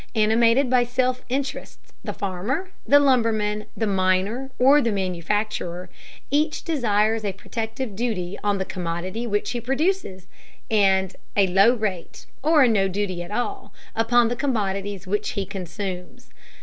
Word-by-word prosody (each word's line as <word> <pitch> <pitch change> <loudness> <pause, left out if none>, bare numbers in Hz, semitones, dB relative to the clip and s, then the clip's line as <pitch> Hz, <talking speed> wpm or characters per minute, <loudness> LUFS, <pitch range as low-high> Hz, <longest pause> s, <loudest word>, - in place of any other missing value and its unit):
Animated 230 +4 +4
by 250 0 +4
self 255 +1 0
interest, 270 +2 -3 0.3
the - - -3
farmer, 215 - -3 0.2
the 285 - +7
lumberman, 225 -6 +1
the 225 - 0
miner, 195 +6 +1
or 275 +4 +6
the 235 -3 +1
manufacturer, 185 -1 -2 0.4
each 300 +2 +1
desires 225 -7 +1
a 200 -2 -2
protective 225 +3 -5
duty 200 -5 -2
on 205 -1 +1
the 190 - -2
commodity 185 +4 -4
which 205 -2 -1
he 240 - -3
produces, 270 - -1 0.5
and 190 -3 +3 0.2
a 200 - +6
low 195 +6 +5
rate, 200 -7 -4 0.2
or 300 -2 +5
no 200 -4 +3
duty 190 -2 -2
at 175 - -7
all, 245 - -4 0.2
upon 235 +1 +3
commodities 200 -7 -2
which 205 +3 -1
he 200 - -2
consumes. 185 -1 -6
215 Hz, 135 wpm, -23 LUFS, 190-245 Hz, 0.5 s, the